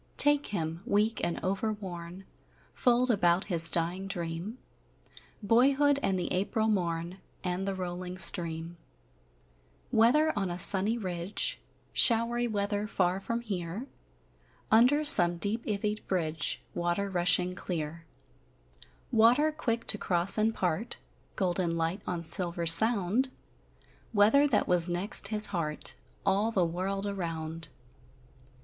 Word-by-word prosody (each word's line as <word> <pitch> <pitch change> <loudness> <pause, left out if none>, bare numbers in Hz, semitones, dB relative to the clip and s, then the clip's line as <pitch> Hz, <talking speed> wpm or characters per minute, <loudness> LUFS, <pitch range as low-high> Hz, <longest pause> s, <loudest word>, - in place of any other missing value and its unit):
Take 290 0 +6
him, 165 -4 -5
weak 210 +3 -1
and 170 - -2
overworn; 190 -3 -6 0.5
Fold 245 0 +1
about 180 -4 +1
his 170 -1 +7
dying 175 +4 -2
dream 175 +4 -6 0.9
Boyhood, 275 +6 +2
and 190 -7 -1
the 180 - -4
April 215 +4 -2
morn, 175 -2 -3 0.2
And 180 +1 -4
the 195 - -3
rolling 180 0 -7
stream: 170 -1 +2 1.1
Weather 300 +8 +2
on 195 -3 -3
a 175 - -5
sunny 200 +5 +6
ridge, 180 -2 -3 0.3
Showery 235 +1 +4
weather, 205 -1 -3
far 185 -2 -1
from 230 +4 -5
here; 195 0 -6 0.9
Under 250 +7 +3
some 175 - +8
deep 210 +6 -1
ivied 210 0 -4
bridge, 160 -5 -2
Water 175 +3 -3
rushing 180 -1 +2
clear: 165 -2 -6 1.1
Water 245 +7 +3
quick 235 -7 -4
to 210 - +1
cross 175 +1 +2
and 215 +1 0
part, 185 +2 -4 0.4
(Golden 175 -3 -2
light 165 +4 -3
on 170 -1 -5
silver 170 -1 0
sound), 210 +7 +5 0.9
Weather 220 +8 +4
that 255 - 0
was 175 -1 +2
next 185 +3 -1
his 210 0 +1
heart 155 -4 -3 0.3
All 200 +3 0
the 185 -5 0
world 190 +4 -4
around! 165 -4 -4
190 Hz, 120 wpm, -28 LUFS, 175-220 Hz, 1.1 s, some